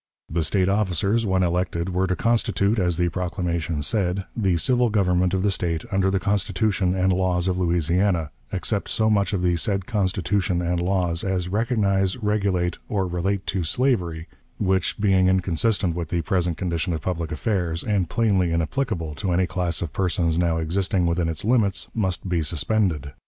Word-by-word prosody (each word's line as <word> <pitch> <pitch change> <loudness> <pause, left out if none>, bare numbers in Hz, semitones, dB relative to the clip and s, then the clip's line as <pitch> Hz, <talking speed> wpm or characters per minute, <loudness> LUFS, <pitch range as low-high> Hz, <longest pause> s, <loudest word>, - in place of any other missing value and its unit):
The 85 +1 0
State 90 +4 +1
officers, 100 +2 +1
when 95 -1 +2
elected, 85 0 -1
were 95 +1 0
to 90 - 0
constitute, 110 -2 +1
as 90 -3 +1
the 85 0 +1
proclamation 85 -3 -2
said, 95 +1 0
"the 95 -6 +1
civil 125 +6 +2
government 90 -3 +2
of 95 - 0
the 100 - +2
State 85 -4 -2
under 95 -1 +2
the 95 0 +1
Constitution 100 -1 0
and 95 0 +2
laws 90 -1 0
of 90 -1 0
Louisiana, 85 -1 +1 0.2
except 100 +2 -2
so 110 -2 +1
much 100 -2 +2
of 95 -4 -1
the 90 -1 +2
said 95 +2 -1
Constitution 95 -3 0
and 90 0 -1
laws 90 -2 0
as 95 -2 -1
recognize, 100 -3 +1
regulate, 100 -5 0
or 100 -3 0
relate 90 +2 -2
to 95 -2 0
slavery, 85 - 0 0.3
which, 95 +1 0
being 95 -3 +3
inconsistent 95 +1 +1
with 85 -3 -4
the 85 -2 -1
present 90 -1 0
condition 85 0 -2
of 80 - -3
public 85 -3 -3
affairs, 85 -1 -1
and 100 -6 0
plainly 100 -7 +2
inapplicable 85 - -1
to 95 +3 -3
any 90 +1 +2
class 90 -2 -2
of 80 - -6
persons 85 -3 0
now 85 -2 +1
existing 90 +3 0
within 85 0 0
its 80 +3 -3
limits, 105 -4 +1
must 95 -4 -1
be 90 -2 0
suspended." 80 -2 -1
90 Hz, 175 wpm, -23 LUFS, 85-100 Hz, 0.3 s, being